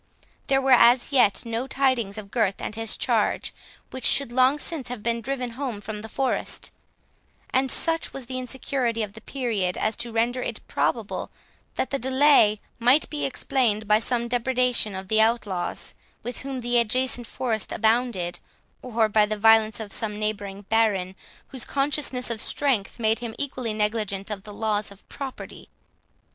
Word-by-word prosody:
There 270 Hz, -1 st, +3 dB
were 270 Hz, -, +2 dB
as 245 Hz, +1 st, +6 dB
yet 245 Hz, -6 st, +3 dB
no 230 Hz, +3 st, -3 dB
tidings 260 Hz, -7 st, 0 dB
of 200 Hz, -2 st, -8 dB
Gurth 215 Hz, -5 st, +1 dB
and -, -, -4 dB
his 225 Hz, -1 st, 0 dB
charge, -, -, +1 dB, 0.4 s
which 260 Hz, -, -7 dB
should 275 Hz, -4 st, +4 dB
long 260 Hz, +3 st, +4 dB
since 300 Hz, -3 st, -4 dB
have 245 Hz, -4 st, -6 dB
been 235 Hz, 0 st, 0 dB
driven 255 Hz, 0 st, -3 dB
home 245 Hz, -3 st, -4 dB
from 210 Hz, 0 st, -6 dB
the 220 Hz, -, -9 dB
forest 265 Hz, +3 st, -2 dB, 0.8 s
and 260 Hz, +1 st, +2 dB
such 330 Hz, +3 st, +1 dB
was 270 Hz, -2 st, -7 dB
the 255 Hz, +1 st, -4 dB
insecurity 250 Hz, -2 st, -2 dB
of 205 Hz, -2 st, -6 dB
the 220 Hz, -, -11 dB
period, 220 Hz, -9 st, -2 dB
as 220 Hz, -, 0 dB
to 235 Hz, 0 st, -4 dB
render 235 Hz, +3 st, 0 dB
it 235 Hz, -3 st, -5 dB
probable 225 Hz, -4 st, -1 dB, 0.5 s
that -, -, -2 dB
the 275 Hz, -, 0 dB
delay 260 Hz, -5 st, +4 dB, 0.2 s
might 250 Hz, +6 st, +4 dB
be 300 Hz, -, -1 dB
explained 240 Hz, -6 st, 0 dB
by 210 Hz, +1 st, +5 dB
some 235 Hz, +1 st, 0 dB
depreciation 245 Hz, -3 st, +1 dB
of 190 Hz, 0 st, -6 dB
the 220 Hz, +2 st, +3 dB
outlaws, 210 Hz, -6 st, -1 dB, 0.3 s
with 245 Hz, -, -5 dB
whom 265 Hz, -1 st, -5 dB
the 240 Hz, 0 st, +2 dB
adjacent 245 Hz, +1 st, 0 dB
forest 230 Hz, -5 st, -2 dB
abounded, 220 Hz, -7 st, +1 dB, 0.4 s
or 230 Hz, -3 st, +1 dB
by 210 Hz, 0 st, +3 dB
the 215 Hz, 0 st, -2 dB
violence 220 Hz, 0 st, +4 dB
of 210 Hz, -3 st, -4 dB
some 210 Hz, -2 st, -1 dB
neighbouring 205 Hz, -2 st, -4 dB
baron, 200 Hz, -4 st, +1 dB, 0.3 s
whose 260 Hz, -3 st, -3 dB
consciousness 275 Hz, -3 st, 0 dB
of 225 Hz, -1 st, -2 dB
strength 250 Hz, -9 st, 0 dB
made 225 Hz, -1 st, +1 dB
him 235 Hz, -2 st, -6 dB
equally 260 Hz, -5 st, -3 dB
negligent 210 Hz, -1 st, -2 dB
of 200 Hz, -2 st, -4 dB
the 210 Hz, -, -8 dB
laws 210 Hz, -1 st, -1 dB
of 200 Hz, 0 st, -16 dB
property. 275 Hz, -2 st, -8 dB
230 Hz, 170 wpm, -25 LUFS, 215-255 Hz, 0.8 s, as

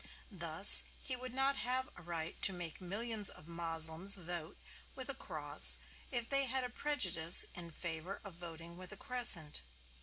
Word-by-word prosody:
Thus -, -, +8 dB, 0.2 s
he 260 Hz, -, -7 dB
would 255 Hz, 0 st, -10 dB
not 270 Hz, +2 st, -2 dB
have 255 Hz, +1 st, -3 dB
a -, -, -14 dB
right 165 Hz, -2 st, -8 dB
to -, -, +4 dB
make 175 Hz, -3 st, -9 dB
millions 210 Hz, +3 st, -4 dB
of 155 Hz, -, -14 dB
Moslems 165 Hz, +2 st, +1 dB
vote 175 Hz, -3 st, -8 dB, 0.4 s
with -, -, -10 dB
a -, -, -4 dB
cross -, -, +4 dB, 0.3 s
if 240 Hz, -3 st, -2 dB
they 275 Hz, +1 st, 0 dB
had 260 Hz, +1 st, -1 dB
a 250 Hz, -, -6 dB
prejudice 185 Hz, -, 0 dB
in 175 Hz, -1 st, -9 dB
favor 170 Hz, +3 st, -8 dB
of 200 Hz, -, -11 dB
voting 170 Hz, 0 st, -12 dB
with 185 Hz, +1 st, -11 dB
a 210 Hz, -, -10 dB
crescent. 205 Hz, -, -2 dB
180 Hz, 170 wpm, -33 LUFS, 165-245 Hz, 0.4 s, Thus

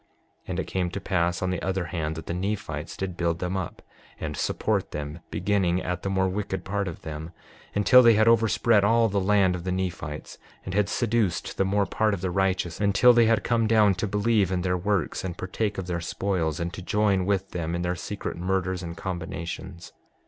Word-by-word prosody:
6:38 -, -, -40 dB, 0.4 s
And 95 Hz, 0 st, -3 dB
it -, -, 0 dB
came 90 Hz, -2 st, -1 dB
to 95 Hz, -, -5 dB
pass 90 Hz, -3 st, 0 dB
on 95 Hz, -, 0 dB
the 90 Hz, -, -2 dB
other 95 Hz, -1 st, -1 dB
hand, 80 Hz, -2 st, -3 dB
that 80 Hz, -, -7 dB
the -, -, -3 dB
Nephites 100 Hz, +4 st, -3 dB
did 95 Hz, -2 st, -3 dB
build 85 Hz, -1 st, 0 dB
them 90 Hz, +2 st, -3 dB
up 95 Hz, -3 st, -5 dB, 0.4 s
and -, -, -4 dB
support -, -, -1 dB
them, 75 Hz, +2 st, -5 dB
beginning 95 Hz, 0 st, +1 dB
at 90 Hz, -1 st, -3 dB
the 95 Hz, -, -2 dB
more 95 Hz, -1 st, +1 dB
wicked 95 Hz, 0 st, -3 dB
part 100 Hz, 0 st, -1 dB
of 85 Hz, -, -7 dB
them, 80 Hz, +1 st, -6 dB, 0.5 s
until 115 Hz, +5 st, +7 dB
they 120 Hz, -2 st, +7 dB
had 110 Hz, +1 st, +4 dB
overspread 115 Hz, -1 st, +4 dB
all 115 Hz, +2 st, +4 dB
the 100 Hz, 0 st, 0 dB
land 95 Hz, -1 st, +3 dB
of 90 Hz, -1 st, -5 dB
the 95 Hz, -, -2 dB
Nephites, 90 Hz, -5 st, -4 dB, 0.3 s
and 95 Hz, -, -5 dB
had 100 Hz, 0 st, +2 dB
seduced 115 Hz, -7 st, 0 dB
the 95 Hz, -, +2 dB
more 100 Hz, +1 st, +2 dB
part 110 Hz, +2 st, +1 dB
of 90 Hz, -, -9 dB
the 95 Hz, -1 st, -1 dB
righteous 95 Hz, -2 st, 0 dB
until 105 Hz, +5 st, +5 dB
they 120 Hz, -1 st, +5 dB
had 110 Hz, -2 st, +2 dB
come 115 Hz, -2 st, +2 dB
down 105 Hz, -2 st, +5 dB
to 95 Hz, +4 st, -2 dB
believe 105 Hz, -1 st, +2 dB
in 90 Hz, -1 st, 0 dB
their 90 Hz, -1 st, +1 dB
works 95 Hz, -2 st, -1 dB
and 90 Hz, -2 st, -4 dB
partake 105 Hz, +2 st, -2 dB
of 95 Hz, -, -3 dB
their 85 Hz, -1 st, -3 dB
spoils, 85 Hz, -3 st, -1 dB
and 85 Hz, +1 st, -3 dB
to 95 Hz, -, -7 dB
join 100 Hz, 0 st, +1 dB
with 95 Hz, -1 st, 0 dB
them 85 Hz, -1 st, -2 dB
in 85 Hz, -, -2 dB
their 90 Hz, 0 st, 0 dB
secret 100 Hz, +4 st, -5 dB
murders 95 Hz, 0 st, -1 dB
and 85 Hz, -1 st, -7 dB
combinations. 85 Hz, 0 st, -6 dB
95 Hz, 215 wpm, -26 LUFS, 90-105 Hz, 0.5 s, until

